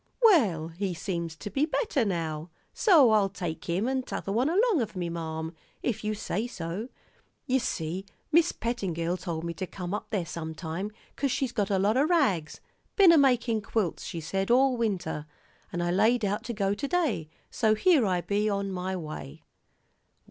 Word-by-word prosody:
"Well, 210 - +5
he 180 +2 -3
seems 170 -2 -3
to 200 +5 -7
be 280 +9 +1
better 330 - 0
now, 165 -5 -2 0.2
so 315 - +6
I'll 205 -2 +4
take 175 -5 -5
him 180 +7 0
and 265 0 0
t'other 195 - -4
one 245 +8 +2
along 400 - +3
of 215 -2 -4
me, 175 -2 -2
marm, 160 -1 -4 0.3
if 235 -4 -1
you 215 0 -1
say 210 +2 -2
so. 190 +2 -5 0.6
Ye 265 -2 +2
see, 185 -4 -3 0.2
Mis' 335 +2 +5
Pettingill 180 -8 -2
told 165 -3 -4
me 170 0 -3
to 185 +1 -5
come 180 0 -6
up 210 - -3
there 200 -6 -1
sometime, 165 +3 -5 0.3
'cause 275 - 0
she's 255 0 0
got 205 -5 -1
a 195 - +2
lot 205 +5 +2
o' 270 - +5
rags 235 - +1 0.3
ben 390 -4 +8
a 335 - +6
makin' 245 -5 +3
quilts, 205 -4 -1
she 170 - -5
said, 195 +5 -2
all 260 +2 +5
winter, 185 -10 -2 0.4
and 175 0 -2
I 175 - 0
laid 220 +5 +3
out 205 +1 -1
to 240 - -3
go 200 -2 0
to 280 +7 -3
day, 280 - 0 0.2
so 220 -2 +2
here 305 +3 +4
I 185 -4 +1
be, 205 +3 0
on 200 -1 -1
my 185 0 -3
way." 155 - -7
200 Hz, 185 wpm, -28 LUFS, 170-245 Hz, 0.6 s, ben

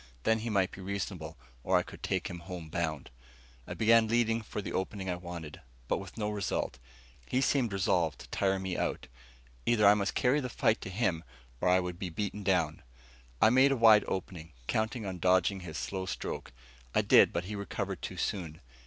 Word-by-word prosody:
Then 110 0 +3
he 115 +2 -4
might 95 -4 +2
be 95 - -10
reasonable, 95 -4 -4 0.3
or - - +3
I - - +2
could - - -12
take - - -1
him 85 - -6
home 85 -2 -8
bound. 80 -4 -3 0.6
I - - -5
began 115 0 +5
leading 115 0 +2
for 105 - -6
the 100 - -5
opening 95 0 -2
I - - -1
wanted, 85 -4 -8 0.3
but - - 0
with 100 +1 -10
no 105 -1 -1
result. 100 -9 -2 0.5
He 130 - +1
seemed 130 -4 +2
resolved 90 -4 +1
to - - -12
tire 95 -1 +1
me 95 -1 -3
out. - - -2 0.6
Either 115 -3 +4
I 100 - +9
must 100 -1 -1
carry 130 +4 +3
the 125 -3 -3
fight 110 -1 +1
to - - -6
him, 90 -5 0 0.4
or 90 - +2
I 90 +1 +5
would 90 -1 -4
be 95 -3 -3
beaten 100 +4 -3
down. 90 -6 +1 0.6
I 110 - +6
made 130 +2 +5
a 135 - +1
wide 110 -2 +7
opening, 85 -4 -5
counting 110 - -1
on 95 -2 -4
dodging 95 +2 +3
his 85 -3 -7
slow 95 -1 -3
stroke. - - -5 0.4
I - - +4
did, - - +6
but 85 - -2
he 105 +4 -5
recovered 100 -3 -4
too - - -6
soon. 85 -5 -3
95 Hz, 200 wpm, -31 LUFS, 90-110 Hz, 0.6 s, I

